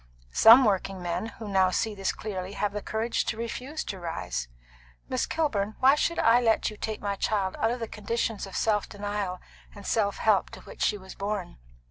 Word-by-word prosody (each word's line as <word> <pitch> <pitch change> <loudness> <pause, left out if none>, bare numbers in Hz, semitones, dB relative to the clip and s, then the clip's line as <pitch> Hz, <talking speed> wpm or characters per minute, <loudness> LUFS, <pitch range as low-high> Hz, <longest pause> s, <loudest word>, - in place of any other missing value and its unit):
Some 240 +4 +9
working 195 -2 0
men 175 +4 -2
who 225 -1 -9
now 190 -2 +3
see 220 +4 0
this 195 -2 -1
clearly 190 -2 -5
have 205 -1 -1
the 210 - -3
courage 225 +3 -1
to 215 - -2
refuse 250 +6 -4
to 190 - -6
rise. 65 - -4 0.6
Miss - - -1
Kilburn, 220 -10 -1
why 265 +1 +6
should 335 +3 0
I 235 +2 +5
let 225 -2 +2
you - - -9
take 215 0 -4
my 200 -1 -1
child 195 -2 0
out 225 - +2
of 245 +2 -2
the 230 - -3
conditions 215 -1 -2
of 195 - -10
self 210 -2 +1
denial 205 -3 -3 0.4
and 200 -1 -11
self 205 -3 +1
help 215 -3 +2
to - - -12
which - - -12
she 210 - +2
was 190 -1 -11
born?" 200 -2 -4
210 Hz, 200 wpm, -27 LUFS, 195-225 Hz, 0.6 s, Some